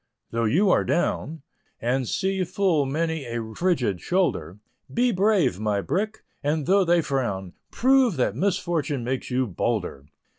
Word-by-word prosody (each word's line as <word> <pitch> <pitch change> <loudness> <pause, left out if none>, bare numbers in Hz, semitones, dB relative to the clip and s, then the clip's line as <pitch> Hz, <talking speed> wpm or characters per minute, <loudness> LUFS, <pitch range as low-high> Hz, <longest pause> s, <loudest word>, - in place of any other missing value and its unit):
Though 115 0 0
you 185 - +3
are - - +3
"down," 160 -3 -1 0.4
And 125 +2 0
see 190 - 0
full 175 -5 +1
many 160 +1 -1
a 115 -2 -5
frigid 125 - 0
shoulder, 135 - 0 0.3
Be 245 +1 +2
brave, 185 - +2
my 105 -2 0
brick, 215 - -2 0.2
and 150 0 0
though 195 +2 +4
they 170 -1 +3
frown, 100 -11 -2 0.2
Prove 260 -5 +3
that - - +1
misfortune 170 -8 -1
makes 130 +2 -3
you 130 0 +1
bolder. 90 - -3
150 Hz, 145 wpm, -25 LUFS, 120-185 Hz, 0.4 s, though